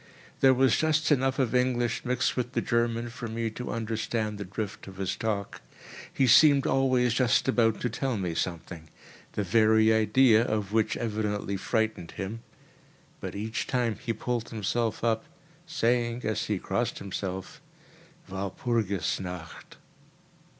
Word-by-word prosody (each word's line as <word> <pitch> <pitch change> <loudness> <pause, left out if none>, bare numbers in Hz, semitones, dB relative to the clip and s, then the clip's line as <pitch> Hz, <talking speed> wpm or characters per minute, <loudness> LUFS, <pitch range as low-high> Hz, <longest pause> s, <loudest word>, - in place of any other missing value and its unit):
There 130 -1 +6
was 130 0 +4
just 155 0 +1
enough 135 -1 +2
of 130 -4 0
English 125 -1 +1
mixed 125 -1 0
with 125 0 -2
the - - +1
German 115 0 0
for 120 -1 -6
me 115 0 -3
to 125 +3 -6
understand 110 -1 -2
the - - -3
drift 105 +3 -6
of 95 -1 -10
his 95 -1 -2
talk. 105 -3 -3 0.5
He 135 - +2
seemed 140 +3 +6
always 130 -3 +2
just 125 +1 +2
about 115 -4 +2
to - - +1
tell 125 +1 -2
me 90 -4 -2
something—the 85 +3 -6
very 110 +2 +4
idea 110 +1 +5
of 105 -4 -2
which 110 -1 +1
evidently 105 -3 -2
frightened 110 -4 -1
him; 105 +4 -5 0.8
but - - -6
each 110 +3 -3
time 120 -4 0
he 120 - -1
pulled 115 +1 -3
himself 115 +1 -2
up, 115 -1 +1 0.4
saying, 120 -5 0
as 110 -1 -1
he - - -1
crossed - - -2
himself: 95 -1 -5 0.7
"Walpurgis 100 0 -1
Nacht!" 90 -3 -8
115 Hz, 145 wpm, -28 LUFS, 105-125 Hz, 0.8 s, There